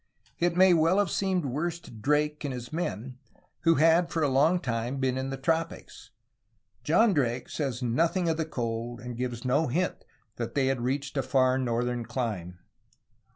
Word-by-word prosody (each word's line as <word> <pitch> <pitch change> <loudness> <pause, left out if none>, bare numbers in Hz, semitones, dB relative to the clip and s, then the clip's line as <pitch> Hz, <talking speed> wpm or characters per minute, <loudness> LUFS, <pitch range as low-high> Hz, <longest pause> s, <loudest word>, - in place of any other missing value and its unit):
It 175 0 +1
may 185 0 +7
well 165 +3 +3
have 205 -4 +2
seemed 190 -4 0
worse 155 +6 -2
to - - -13
Drake 150 +7 0
and 145 - -2
his 125 +2 -7
men 125 - -4 0.4
who 165 0 +3
had 165 +3 +4
for 160 - -1
a - - +3
long 150 +7 +3
time 120 -1 -2
been 130 -1 0
in 130 +1 -3
the 135 - -4
tropics. 165 +4 -3 0.7
John 220 -2 +4
Drake 125 -5 0
says 135 -4 -3
nothing 165 +9 +1
of 160 -1 +1
the 160 - -1
cold, 120 -4 -4
and 125 0 -7
gives 125 0 -4
no 145 +5 +2
hint 175 +8 -1 0.3
that 115 -1 -4
they 140 -2 +2
had 135 -2 0
reached 140 +3 -2
a - - +3
far 130 0 +2
northern 120 -1 -1
clime. 105 -9 -4
135 Hz, 180 wpm, -28 LUFS, 120-165 Hz, 0.7 s, may